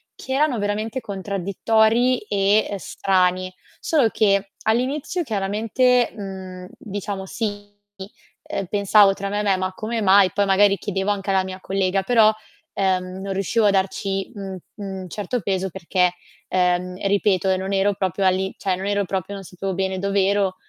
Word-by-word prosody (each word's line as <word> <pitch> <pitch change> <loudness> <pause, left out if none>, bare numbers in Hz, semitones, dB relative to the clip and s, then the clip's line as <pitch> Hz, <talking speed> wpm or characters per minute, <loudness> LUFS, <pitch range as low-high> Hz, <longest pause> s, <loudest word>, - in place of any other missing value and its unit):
che 265 - -9
erano 275 -3 +2
veramente 215 +4 -2
contraddittori 220 +4 +1
e 205 0 +1
strani. 185 -1 0 0.3
Solo 295 -7 +2
che 200 -2 +1
all'inizio 270 +10 0
chiaramente, 225 +3 +1
mhmm, 190 -3 -8
diciamo, 200 -2 -5
sì, 205 0 -4 0.7
ehm, 195 - -4
pensavo 200 0 +4
tra 200 0 -5
me 205 +1 -2
e - - -3
me: 195 -2 +2
"Ma 185 0 -2
come 225 +3 -3
mai?" 195 -1 +5
Poi 205 -1 +1
magari 200 +1 +4
chiedevo 195 0 -2
anche 195 -1 -2
alla 190 -1 +2
mia 185 0 -7
collega, 190 0 0
però, 220 0 +5 0.4
ehm, 185 -1 -1
non 195 0 -3
riuscivo 200 +4 +1
a 205 - +5
darci 195 +1 -1
un 195 -2 -6 0.2
un 190 -4 -6
certo 210 +5 -3
peso 190 0 -1
perché, 180 0 0 0.3
ehm, 180 0 +1
ripeto, 195 -1 +2
ehm, 185 0 +2
non 190 +1 -3
ero 195 +1 +2
proprio 190 +1 -1
all'i 190 +1 +1
cioè, 190 -2 -1
non 190 - -5
ero 200 0 +1
proprio 190 +1 -3
non 195 -1 -7
sapevo 190 +1 -5
bene 190 0 -2
dov'ero, 200 0 +1
195 Hz, 160 wpm, -22 LUFS, 190-210 Hz, 0.7 s, mai